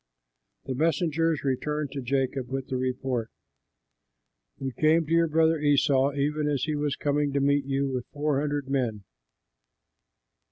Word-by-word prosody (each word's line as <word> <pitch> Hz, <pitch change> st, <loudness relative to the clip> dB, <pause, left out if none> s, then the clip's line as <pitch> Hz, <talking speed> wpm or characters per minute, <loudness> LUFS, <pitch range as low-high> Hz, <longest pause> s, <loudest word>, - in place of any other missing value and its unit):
'" -, -, -53 dB
The 130 Hz, -, -3 dB
messengers 165 Hz, +2 st, +1 dB
returned 145 Hz, +2 st, -1 dB
to 140 Hz, -, -4 dB
Jacob 130 Hz, 0 st, -1 dB
with 135 Hz, 0 st, -4 dB
the 130 Hz, -, -2 dB
report, 130 Hz, -2 st, -2 dB, 1.3 s
"We 135 Hz, -1 st, -4 dB
came 155 Hz, +6 st, +3 dB
to 155 Hz, -, -8 dB
your 165 Hz, 0 st, +4 dB
brother 160 Hz, 0 st, +3 dB
Esau, 140 Hz, -1 st, +3 dB
even 150 Hz, +2 st, 0 dB
as 145 Hz, -3 st, 0 dB
he 155 Hz, -, -1 dB
was 145 Hz, -1 st, -1 dB
coming 145 Hz, 0 st, 0 dB
to 140 Hz, -, +2 dB
meet 140 Hz, 0 st, +2 dB
you 140 Hz, 0 st, 0 dB
with 130 Hz, -2 st, -3 dB
four 145 Hz, -1 st, 0 dB
hundred 145 Hz, -2 st, -2 dB
men." 120 Hz, -7 st, -1 dB
140 Hz, 155 wpm, -27 LUFS, 130-150 Hz, 1.3 s, your